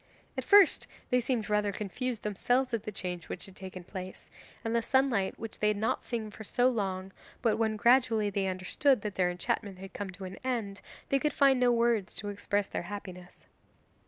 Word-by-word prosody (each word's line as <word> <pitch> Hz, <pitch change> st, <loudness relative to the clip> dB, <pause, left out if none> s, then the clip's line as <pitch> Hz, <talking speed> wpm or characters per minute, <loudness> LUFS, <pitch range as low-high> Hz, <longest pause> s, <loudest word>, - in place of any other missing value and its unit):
At -, -, -2 dB
first 405 Hz, -4 st, +6 dB, 0.2 s
they 250 Hz, -, +5 dB
seemed 240 Hz, -3 st, -1 dB
rather 210 Hz, -1 st, +1 dB
confused 215 Hz, +4 st, -3 dB
themselves 245 Hz, +5 st, +1 dB
at 230 Hz, -, -1 dB
the 215 Hz, -, -3 dB
change 180 Hz, -3 st, -5 dB
which -, -, -5 dB
had 195 Hz, -, -13 dB
taken 185 Hz, -1 st, -8 dB
place, 185 Hz, 0 st, -8 dB, 0.3 s
and 225 Hz, +1 st, 0 dB
the 230 Hz, -, +3 dB
sunlight 245 Hz, -6 st, +2 dB
which 225 Hz, -1 st, -7 dB
they 210 Hz, -, +2 dB
had 210 Hz, -1 st, +2 dB
not 220 Hz, +2 st, -1 dB
seen 225 Hz, -3 st, -3 dB
for 220 Hz, -, -9 dB
so 245 Hz, +4 st, +2 dB
long, 195 Hz, -5 st, -2 dB, 0.3 s
but 225 Hz, -3 st, +3 dB
when 220 Hz, -1 st, +1 dB
gradually 230 Hz, -2 st, +4 dB
they 195 Hz, -1 st, 0 dB
understood 190 Hz, +7 st, +2 dB
that 210 Hz, -2 st, -3 dB
their 180 Hz, -2 st, +2 dB
enchantment 185 Hz, +2 st, -2 dB
had 190 Hz, +1 st, -10 dB
come 205 Hz, -1 st, -4 dB
to 185 Hz, +1 st, -9 dB
an 185 Hz, +1 st, -8 dB
end, 225 Hz, -6 st, -2 dB, 0.3 s
they 275 Hz, -, +3 dB
could 300 Hz, +2 st, 0 dB
find 275 Hz, -3 st, +5 dB
no 250 Hz, -1 st, +4 dB
words 235 Hz, -4 st, +1 dB
to 205 Hz, -, -4 dB
express 205 Hz, 0 st, -1 dB
their -, -, -3 dB
happiness. 180 Hz, -3 st, -9 dB
210 Hz, 200 wpm, -30 LUFS, 195-240 Hz, 0.3 s, first